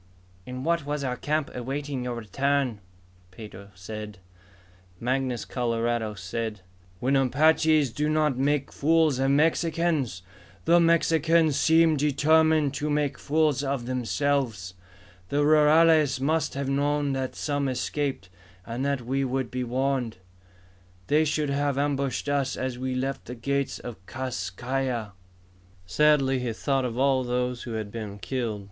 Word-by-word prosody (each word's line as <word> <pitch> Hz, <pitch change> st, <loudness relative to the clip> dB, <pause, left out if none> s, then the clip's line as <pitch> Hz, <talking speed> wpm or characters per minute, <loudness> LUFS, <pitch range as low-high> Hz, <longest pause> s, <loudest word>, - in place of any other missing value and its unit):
"In 125 Hz, 0 st, -6 dB
what 170 Hz, +1 st, +1 dB
was 145 Hz, 0 st, -3 dB
our 125 Hz, -2 st, -1 dB
camp, 150 Hz, +2 st, -2 dB
awaiting 135 Hz, +1 st, -4 dB
your 125 Hz, -1 st, -3 dB
return," 130 Hz, +2 st, -1 dB, 0.5 s
Pedro 100 Hz, 0 st, -11 dB
said. 105 Hz, +2 st, -8 dB, 0.8 s
Mangus 125 Hz, 0 st, -1 dB
Coloradus 115 Hz, -3 st, -1 dB
said, 105 Hz, +2 st, -4 dB, 0.4 s
"When 130 Hz, +4 st, +1 dB
Apaches 150 Hz, +1 st, +3 dB
do 150 Hz, +4 st, -1 dB
not 155 Hz, -3 st, +2 dB
make 140 Hz, +1 st, 0 dB
fools 155 Hz, -2 st, +2 dB
of 135 Hz, 0 st, +2 dB
Mexicans, 155 Hz, -, +1 dB, 0.4 s
the 170 Hz, +1 st, +5 dB
Mexicans 165 Hz, -2 st, +3 dB
seem 160 Hz, +1 st, +4 dB
determined 150 Hz, +1 st, +3 dB
to 150 Hz, +2 st, -2 dB
make 145 Hz, -1 st, 0 dB
fools 150 Hz, -2 st, +1 dB
of 135 Hz, -3 st, -2 dB
themselves. 125 Hz, -5 st, -1 dB, 0.6 s
The 145 Hz, +1 st, +1 dB
rurales 155 Hz, -1 st, +5 dB
must 155 Hz, +2 st, 0 dB
have 140 Hz, -1 st, -2 dB
known 145 Hz, +1 st, 0 dB
that 130 Hz, -1 st, -3 dB
some 145 Hz, -2 st, -1 dB
escaped, 135 Hz, -3 st, -2 dB, 0.4 s
and 120 Hz, +3 st, -4 dB
that 140 Hz, -2 st, 0 dB
we 135 Hz, +3 st, -1 dB
would 130 Hz, -1 st, -2 dB
be 125 Hz, 0 st, -2 dB
warned. 125 Hz, -2 st, -1 dB, 0.9 s
They 155 Hz, +6 st, +3 dB
should 150 Hz, -1 st, 0 dB
have 140 Hz, -1 st, 0 dB
ambushed 140 Hz, -2 st, -1 dB
us 140 Hz, -2 st, 0 dB
as 130 Hz, -1 st, -3 dB
we 130 Hz, 0 st, -2 dB
left 135 Hz, +2 st, -3 dB
the 125 Hz, -, -7 dB
gates 140 Hz, +3 st, -2 dB
of 115 Hz, -6 st, -9 dB
Kas 120 Hz, -8 st, -4 dB
Kai 130 Hz, +8 st, -2 dB
Ya." 115 Hz, -5 st, -3 dB, 0.7 s
Sadly 135 Hz, +6 st, +3 dB
he 125 Hz, -2 st, -2 dB
thought 135 Hz, +3 st, 0 dB
of 120 Hz, -1 st, -4 dB
all 135 Hz, -1 st, +2 dB
who 125 Hz, -1 st, -2 dB
had 110 Hz, -2 st, -4 dB
been 105 Hz, -3 st, -6 dB
killed. 110 Hz, +3 st, -3 dB
135 Hz, 140 wpm, -26 LUFS, 120-150 Hz, 0.9 s, the